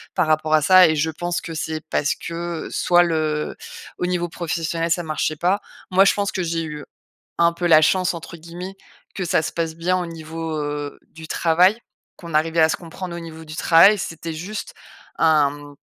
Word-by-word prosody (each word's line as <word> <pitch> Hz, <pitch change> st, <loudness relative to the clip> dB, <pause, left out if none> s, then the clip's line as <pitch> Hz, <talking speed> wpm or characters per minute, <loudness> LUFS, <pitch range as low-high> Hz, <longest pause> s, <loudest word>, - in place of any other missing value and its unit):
Par 180 Hz, -4 st, +2 dB
rapport 155 Hz, 0 st, +1 dB
à 155 Hz, -, +5 dB
ça 185 Hz, +3 st, +7 dB
et 155 Hz, -, +1 dB
je 155 Hz, +2 st, 0 dB
pense 175 Hz, +2 st, -3 dB
que 165 Hz, -, -7 dB
c'est 160 Hz, 0 st, -3 dB
parce 145 Hz, -, 0 dB
que 170 Hz, 0 st, -5 dB
soit 175 Hz, 0 st, +4 dB
le 155 Hz, -3 st, -1 dB, 0.4 s
au -, -, -1 dB
niveau 175 Hz, -1 st, -1 dB
professionnel, 165 Hz, 0 st, -2 dB
ça 175 Hz, +1 st, +1 dB
marchait 155 Hz, -1 st, -2 dB
pas. 180 Hz, +6 st, +1 dB, 0.3 s
Moi, 190 Hz, +1 st, +5 dB
je -, -, +5 dB
pense 200 Hz, -1 st, -1 dB
que 185 Hz, -, -2 dB
j'ai 165 Hz, -1 st, -2 dB
eu, 150 Hz, -2 st, -7 dB, 0.5 s
un 170 Hz, 0 st, +4 dB
peu 170 Hz, +1 st, -4 dB
«la 155 Hz, -2 st, +7 dB
chance» 185 Hz, +3 st, +2 dB
entre 170 Hz, 0 st, -8 dB
guillemets, 170 Hz, +3 st, -8 dB, 0.4 s
que 190 Hz, -, -4 dB
ça 175 Hz, -2 st, +2 dB
se -, -, -5 dB
passe 165 Hz, -1 st, -2 dB
bien 175 Hz, +3 st, 0 dB
au 180 Hz, -, -2 dB
niveau, 165 Hz, -1 st, -6 dB
heu, 145 Hz, -1 st, -4 dB
du 160 Hz, -1 st, -11 dB
travail, 180 Hz, +6 st, +3 dB, 0.4 s
qu'on 170 Hz, -2 st, -10 dB
arrivait 160 Hz, +2 st, +1 dB
à 160 Hz, -, +6 dB
se -, -, 0 dB
comprendre 170 Hz, +1 st, -8 dB
au -, -, -5 dB
niveau 160 Hz, -1 st, -10 dB
du 155 Hz, 0 st, -9 dB
travail. 170 Hz, +6 st, +6 dB
C'était 165 Hz, -2 st, -5 dB
juste, 210 Hz, -, -6 dB, 0.4 s
hem, 145 Hz, -2 st, +1 dB
165 Hz, 200 wpm, -21 LUFS, 155-175 Hz, 0.5 s, ça